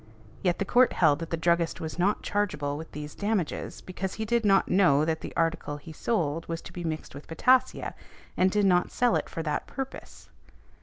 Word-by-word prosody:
Yet 180 -3 +1
the 200 - -1
Court 250 +4 +4
held 155 -4 +3
that 165 - -5
the 165 - -1
druggist 170 0 +1
was 160 +2 -6
not 200 +4 +1
chargeable 150 -9 -1
with 160 +2 -8
these 150 0 -7
damages, 205 -5 -2
because 185 +1 -5
he 220 - -3
did 235 +1 +1
not 195 -2 +4
know 175 -6 +4
that 160 0 -1
the - - -6
article 165 -3 0
he 155 +2 -11
sold 165 -5 -1
was 165 0 -3
to - - -11
be 175 - -6
mixed 155 -1 -4
with 140 +2 -10
potassia, 255 +10 +2 0.4
and 185 - +3
did 205 +1 +2
not 180 -2 +3
sell 245 -2 +2
it - - -1
for 165 - -4
that 150 -2 -2
purpose. 270 -1 -8
170 Hz, 205 wpm, -28 LUFS, 160-205 Hz, 0.4 s, Court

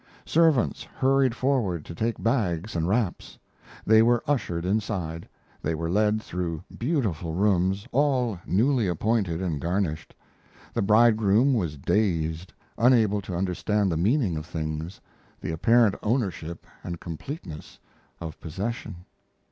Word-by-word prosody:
Servants 160 -6 +3
hurried 135 -2 +1
forward 120 - 0
to - - -8
take 115 +6 -1
bags 105 -6 0
and 85 0 0
wraps. 105 -1 -1 0.5
They 110 0 +6
were 120 +1 +3
ushered 90 -12 -1
inside; 90 -5 -2 0.3
they 80 +1 -1
were 85 +1 -3
led 105 +2 +2
through 85 -2 -4
beautiful 110 - -1
rooms, 95 0 +1
all 125 -7 +1
newly 115 +2 +2
appointed 95 -1 0
and 80 -6 -2
garnished. 85 -3 -2 0.6
The - - 0
bridegroom 110 +3 +4
was 85 - -1
dazed, 85 -1 0 0.3
unable 110 -4 +4
to 95 -2 -6
understand 95 +2 0
the - - 0
meaning 100 - +1
of 75 +1 -6
things, 80 +1 -4 0.4
the - - -4
apparent 115 +6 +4
ownership 95 -8 -2 0.2
and 85 -1 -5
completeness 85 - -8 0.4
of 80 -2 -7
possession. 95 +1 -5
100 Hz, 125 wpm, -26 LUFS, 85-115 Hz, 0.6 s, They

